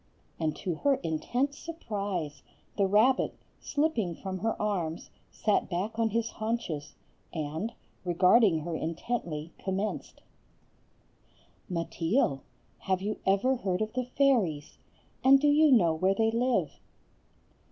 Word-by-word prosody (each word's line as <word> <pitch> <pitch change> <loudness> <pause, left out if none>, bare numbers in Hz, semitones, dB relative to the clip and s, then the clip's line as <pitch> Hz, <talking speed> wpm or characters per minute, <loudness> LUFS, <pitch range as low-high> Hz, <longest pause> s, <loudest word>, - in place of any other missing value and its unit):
And 155 -2 0
to 180 - -3
her 280 - +3
intense 245 - -1
surprise, 200 - -4 0.3
the 200 -2 +2
rabbit, 220 +7 +3 0.2
slipping 285 - 0
from 190 +1 -5
her 225 +4 -1
arms, 175 -6 -2 0.2
sat 210 -2 0
back 200 +5 -3
on 225 -1 +3
his 230 +1 -1
haunches, 215 -10 -3 0.4
and, 160 +7 -3 0.3
regarding 180 0 +4
her 165 +1 -4
intently, 165 -2 -3
commenced:— 195 +2 -3 1.5
"Mateel, 165 - 0 0.4
have 190 -1 -1
you 215 +1 -2
ever 205 +7 +3
heard 190 -3 -1
of 215 - -6
the 255 0 -1
fairies? 210 - +2 0.4
And 270 +1 +7
do 295 - +2
you 300 +1 +5
know 175 -10 +5
where 185 +5 +1
they 225 +2 +2
live?" 245 +2 0
200 Hz, 120 wpm, -29 LUFS, 170-235 Hz, 1.5 s, And